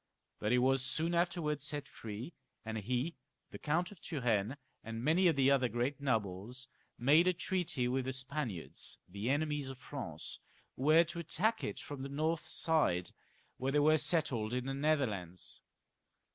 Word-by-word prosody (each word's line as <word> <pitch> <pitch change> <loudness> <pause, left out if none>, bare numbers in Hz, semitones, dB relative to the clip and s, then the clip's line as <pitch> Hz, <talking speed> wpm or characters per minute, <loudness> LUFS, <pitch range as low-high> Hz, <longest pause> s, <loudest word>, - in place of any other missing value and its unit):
But 105 - 0
he 125 - +5
was 130 +1 +3
soon 160 +6 0
after 170 -3 +1
set 145 -1 -4
free, 115 +9 -7 0.3
and 110 0 -3
he, 125 - -1 0.3
the - - -8
Count 175 +5 0
of 200 - -13
Turenne, 120 -4 0 0.3
and 115 +1 -5
many 170 +6 +4
of 165 - +4
the 135 0 +4
other 130 -3 +3
great 125 +5 -1
nobles, 115 0 -1 0.3
made 150 +8 +5
a 185 - +5
treaty 175 -7 0
with 130 +1 0
the 130 - -2
Spaniards, 130 - -4
the 100 +6 -3
enemies 145 -1 0
of 135 - -7
France, 130 - -5 0.4
who 130 - -4
were 160 +3 +7
to 170 +1 -6
attack 205 +7 0
it - - -3
from 145 -2 -7
the 135 - -4
north 155 +3 -1
side, 145 - +1 0.5
where 135 +1 -1
they - - +4
were 155 +2 +5
settled 145 -8 +2
in 125 0 -1
the 135 - -2
Netherlands. 125 - -1
135 Hz, 170 wpm, -34 LUFS, 120-155 Hz, 0.5 s, were